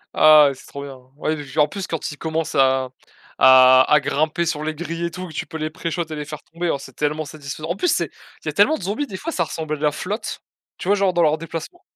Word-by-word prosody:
Ah, 155 Hz, -2 st, +7 dB
c'est 130 Hz, -, -15 dB
trop 140 Hz, -, -8 dB
bien, 135 Hz, -2 st, -9 dB, 0.2 s
ouais, 155 Hz, 0 st, -2 dB
j'ai 140 Hz, +2 st, -5 dB
en 150 Hz, -, +5 dB
plus 195 Hz, +3 st, -6 dB
quand 165 Hz, -2 st, -3 dB
il 150 Hz, -, -10 dB
commence 160 Hz, -1 st, -2 dB
à 130 Hz, -1 st, +2 dB, 0.5 s
à 130 Hz, 0 st, +8 dB
à 150 Hz, -, +7 dB
grimper 155 Hz, +4 st, 0 dB
sur 155 Hz, -2 st, -2 dB
les 155 Hz, 0 st, -3 dB
grilles 165 Hz, +1 st, -4 dB
et -, -, -1 dB
tout 185 Hz, +1 st, -6 dB
tu -, -, -4 dB
peux 160 Hz, -, -6 dB
les 155 Hz, 0 st, -3 dB
pré-shots 165 Hz, +2 st, -3 dB
et -, -, -3 dB
les 150 Hz, -, -4 dB
faire 150 Hz, 0 st, -8 dB
tomber, 170 Hz, +1 st, -3 dB
c'est 135 Hz, -2 st, -12 dB
tellement 150 Hz, +1 st, -1 dB
satisfaisant. 150 Hz, +1 st, -7 dB
En -, -, -1 dB
plus, 355 Hz, -, -1 dB, 0.5 s
c'est -, -, -5 dB
tellement 315 Hz, -, +4 dB
de -, -, -10 dB
zombies 210 Hz, +10 st, -2 dB
des 190 Hz, -, -6 dB
fois 330 Hz, -, -4 dB
ça 175 Hz, -, 0 dB
ressemble 155 Hz, -1 st, -4 dB
à -, -, -2 dB
de -, -, -14 dB
la 150 Hz, -1 st, +3 dB
flotte, 205 Hz, +9 st, -5 dB, 0.4 s
tu -, -, -7 dB
vois 200 Hz, -, +4 dB
genre 195 Hz, -2 st, +1 dB
dans 175 Hz, -1 st, +3 dB
leur 155 Hz, 0 st, +2 dB
déplacement. 165 Hz, -, -7 dB
155 Hz, 255 wpm, -21 LUFS, 145-170 Hz, 0.5 s, à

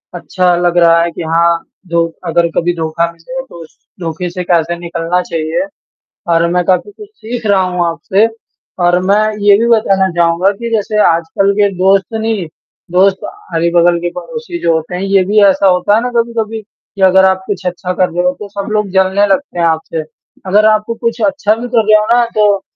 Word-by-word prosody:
अच्छा 180 Hz, -2 st, 0 dB
लग 175 Hz, 0 st, 0 dB
रहा 170 Hz, -1 st, +5 dB
है 170 Hz, 0 st, -1 dB
कि 165 Hz, -, -6 dB
हाँ 170 Hz, 0 st, +3 dB, 0.3 s
जो 170 Hz, -1 st, +1 dB, 0.2 s
अगर 170 Hz, 0 st, +2 dB
कभी 175 Hz, +1 st, +1 dB
धोखा 165 Hz, +1 st, -2 dB
मिले, 170 Hz, +11 st, -7 dB
तो 170 Hz, -10 st, -12 dB
उस 160 Hz, -, -19 dB, 0.2 s
धोखे 170 Hz, +1 st, -4 dB
से 180 Hz, +1 st, -5 dB
कैसे 170 Hz, -1 st, 0 dB
निकलना 170 Hz, +1 st, -2 dB
चाहिए 165 Hz, -, -3 dB, 0.7 s
और 165 Hz, 0 st, +2 dB
मैं 180 Hz, 0 st, +1 dB
काफ़ी 185 Hz, -, 0 dB
कुछ 415 Hz, 0 st, -13 dB
सीख 240 Hz, -, -7 dB
रहा 195 Hz, -2 st, +3 dB
हूँ 180 Hz, -1 st, -1 dB
आपसे 190 Hz, +6 st, +1 dB, 0.6 s
और 175 Hz, +1 st, +3 dB
मैं 210 Hz, -, +4 dB, 0.2 s
ये 200 Hz, -1 st, +6 dB
भी 230 Hz, -, +1 dB
बताना 195 Hz, -3 st, +1 dB
चाहूँगा 170 Hz, +3 st, +2 dB
कि 235 Hz, 0 st, -4 dB
जैसे 210 Hz, 0 st, 0 dB
आजकल 170 Hz, +4 st, +1 dB
के 205 Hz, -, +3 dB
दोस्त 190 Hz, +1 st, +3 dB
नहीं, 220 Hz, -5 st, -2 dB, 0.4 s
दोस्त 190 Hz, +2 st, +2 dB, 0.3 s
अगल-बगल 170 Hz, +1 st, +2 dB
के 175 Hz, 0 st, -2 dB
पड़ोसी 465 Hz, -, -7 dB
जो 165 Hz, -, +2 dB
होते 160 Hz, +2 st, -3 dB
हैं, 180 Hz, -, -4 dB
ये 195 Hz, -1 st, +2 dB
भी 210 Hz, +3 st, +2 dB
ऐसा 195 Hz, 0 st, +3 dB
होता 180 Hz, +2 st, +2 dB
है 225 Hz, -, +2 dB
ना 250 Hz, -, -2 dB
कभी-कभी 225 Hz, -1 st, -3 dB
कि 205 Hz, -1 st, -15 dB
अगर 190 Hz, 0 st, +5 dB
आप 190 Hz, 0 st, +1 dB
कुछ 195 Hz, -2 st, -4 dB
अच्छा 180 Hz, 0 st, -3 dB
कर 185 Hz, 0 st, +1 dB
रहे 175 Hz, +1 st, -2 dB
हो, 180 Hz, -, +2 dB
तो 210 Hz, -, -7 dB
सब 200 Hz, +1 st, -6 dB
लोग 210 Hz, -2 st, 0 dB
जलने 190 Hz, +1 st, +2 dB
लगते 195 Hz, -1 st, -1 dB
हैं 170 Hz, -, +2 dB
आपसे। 160 Hz, 0 st, -1 dB, 0.5 s
अगर 205 Hz, +3 st, +3 dB
आपको 215 Hz, +2 st, 0 dB
कुछ 230 Hz, 0 st, -3 dB
अच्छा 205 Hz, +2 st, +1 dB
भी 235 Hz, +2 st, -6 dB
कर 230 Hz, -3 st, +1 dB
रहे 215 Hz, 0 st, +5 dB
हो 210 Hz, -, -1 dB
ना, 240 Hz, -, +4 dB
तो 210 Hz, -4 st, +1 dB
190 Hz, 205 wpm, -13 LUFS, 170-210 Hz, 0.7 s, ये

